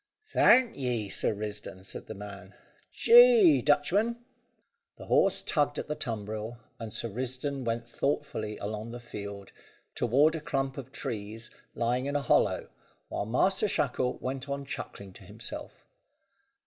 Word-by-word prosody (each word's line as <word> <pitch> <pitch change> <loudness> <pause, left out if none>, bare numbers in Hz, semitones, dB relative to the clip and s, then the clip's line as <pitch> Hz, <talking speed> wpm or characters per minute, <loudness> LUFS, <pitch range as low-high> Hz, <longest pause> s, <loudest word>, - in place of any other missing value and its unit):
"Thank 255 -2 +5
ye, 120 -6 -2
Sir - - +2
Risdon," 105 -2 -6
said - - -6
the 110 - -7
man. 100 -1 -10 0.4
"Jee, 470 -9 +7
Dutchman!" 200 +11 +2 0.8
The - - -10
horse 485 0 +3
tugged 145 -2 +1
at - - -4
the 150 - -1
tumbril, 110 0 -4 0.2
and 115 -2 -6
Sir 115 - -3
Risdon 130 +4 -3
went 115 0 -2
thoughtfully 110 -5 -2
along 105 +2 -5
the 120 - -6
field, 100 -4 -8 0.4
toward 140 +7 +3
a 160 - -4
clump 135 -2 -2
of 130 -1 -9
trees 115 -3 -6 0.2
lying 125 +3 0
in 140 - -2
a 145 - +2
hollow, - - +2 0.4
while 100 - -3
Master 190 - +2
Shackle 130 -8 0
went 135 +2 -5
on 140 0 -3
chuckling 100 -7 -7
to - - -14
himself. - - -8
125 Hz, 145 wpm, -29 LUFS, 110-145 Hz, 0.8 s, Jee